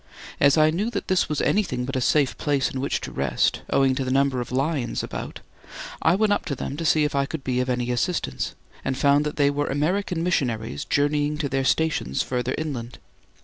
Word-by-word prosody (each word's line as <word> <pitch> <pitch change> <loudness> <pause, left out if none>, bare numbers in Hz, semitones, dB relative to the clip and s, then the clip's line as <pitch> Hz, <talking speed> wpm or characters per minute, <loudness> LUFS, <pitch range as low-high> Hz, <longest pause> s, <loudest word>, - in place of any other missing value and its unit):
As 140 +2 +5
I 155 0 +5
knew 200 +8 -1
that - - -4
this 185 -3 +2
was 150 - -1
anything 130 -12 +1
but 135 +2 -4
a 130 - 0
safe 140 +1 +2
place 145 -3 +1
in 130 - -4
which 140 - -1
to - - -6
rest, - - 0
owing 135 -1 +3
to 135 +1 -1
the 130 - -3
number 135 -1 +2
of 120 - -7
lions 135 -1 -1
about, - - -6 0.6
I 165 - +4
went 210 +1 +3
up - - -1
to 140 - -2
them 135 - -4
to 165 - -3
see 155 0 +4
if 150 - 0
I 140 -1 +1
could 155 -2 -5
be 125 -1 0
of 125 0 -1
any 125 0 0
assistance, 120 - -2 0.3
and 130 -1 -2
found 140 +2 +3
that 150 - -4
they 140 -1 +3
were 145 +1 -1
American 165 +4 0
missionaries 115 - -1
journeying 145 +1 +1
to 150 -2 -2
their 135 0 0
stations 145 - +1
further 125 0 -2
inland. 125 -7 -4
140 Hz, 220 wpm, -24 LUFS, 130-155 Hz, 0.6 s, As